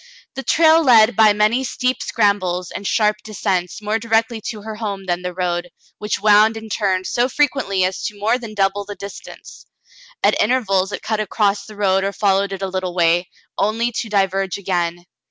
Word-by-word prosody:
The 270 Hz, -, -5 dB
trail 320 Hz, +3 st, +4 dB
led 230 Hz, -4 st, +5 dB
by 215 Hz, 0 st, +6 dB
many 215 Hz, +5 st, +2 dB
steep 255 Hz, 0 st, -2 dB
scrambles 185 Hz, -5 st, 0 dB
and 200 Hz, -, -5 dB
sharp 210 Hz, -2 st, +2 dB
de 215 Hz, -1 st, -10 dB
scents 185 Hz, +1 st, -2 dB
more 215 Hz, +2 st, -1 dB
directly 225 Hz, 0 st, 0 dB
to 210 Hz, -3 st, -7 dB
her 220 Hz, 0 st, -6 dB
home 200 Hz, -3 st, -5 dB
than 175 Hz, -1 st, -2 dB
the 180 Hz, 0 st, -4 dB
road, 175 Hz, -1 st, -2 dB, 0.3 s
which 210 Hz, 0 st, -2 dB
wound 215 Hz, +2 st, +4 dB
and 220 Hz, -1 st, -9 dB
turned 190 Hz, -3 st, 0 dB
so 245 Hz, +5 st, 0 dB
frequently 260 Hz, -9 st, 0 dB
as 185 Hz, 0 st, -1 dB
to 210 Hz, -, -5 dB
more 225 Hz, +5 st, +1 dB
than 225 Hz, -3 st, -9 dB
double 200 Hz, 0 st, 0 dB
the 205 Hz, 0 st, -8 dB
distance. 200 Hz, 0 st, -11 dB, 0.6 s
At -, -, +3 dB
intervals 205 Hz, -5 st, +1 dB
it -, -, -6 dB
cut 220 Hz, -1 st, -2 dB
across 200 Hz, -1 st, 0 dB
the 215 Hz, -, -11 dB
road 195 Hz, -2 st, +1 dB
or 200 Hz, +1 st, -2 dB
fol 195 Hz, -2 st, +2 dB
lowed 200 Hz, 0 st, -2 dB
it 195 Hz, 0 st, -5 dB
a -, -, -1 dB
little 185 Hz, -1 st, -4 dB
w^ay, 175 Hz, 0 st, +2 dB, 0.3 s
only 225 Hz, +4 st, 0 dB
to 225 Hz, -1 st, -4 dB
diverge 195 Hz, -2 st, 0 dB
again. 175 Hz, -3 st, -2 dB
205 Hz, 195 wpm, -19 LUFS, 190-220 Hz, 0.6 s, by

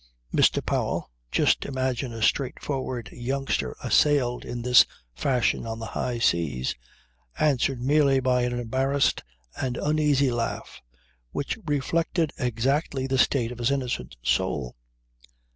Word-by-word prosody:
Mr. -, -, +3 dB
Powell -, -, -1 dB, 0.2 s
just -, -, +3 dB
imagine 130 Hz, -2 st, -2 dB
a 115 Hz, -1 st, -4 dB
straightforward 130 Hz, -2 st, -1 dB
youngster 130 Hz, -, -2 dB
assailed 135 Hz, -5 st, +3 dB
in 120 Hz, -1 st, -5 dB
this 125 Hz, 0 st, +7 dB, 0.3 s
fashion 120 Hz, -, 0 dB
on 115 Hz, 0 st, -4 dB
the 115 Hz, -, -6 dB
high 125 Hz, -2 st, -2 dB
seas 80 Hz, -, +1 dB, 0.6 s
answered 135 Hz, -3 st, +1 dB
merely 140 Hz, +1 st, +3 dB
by 125 Hz, -1 st, +2 dB
an 125 Hz, 0 st, -1 dB
embarrassed 135 Hz, +4 st, +1 dB, 0.4 s
and 125 Hz, -2 st, -2 dB
uneasy 150 Hz, -3 st, +2 dB
laugh 115 Hz, -1 st, -4 dB, 0.5 s
which 140 Hz, -, -3 dB
reflected 160 Hz, +3 st, 0 dB
exactly 130 Hz, +3 st, 0 dB
the 135 Hz, -1 st, 0 dB
state 125 Hz, -4 st, +2 dB
of 120 Hz, -, -8 dB
his 120 Hz, -, +1 dB
innocent 125 Hz, -, -2 dB
soul. 70 Hz, -1 st, 0 dB
125 Hz, 125 wpm, -26 LUFS, 120-140 Hz, 0.6 s, this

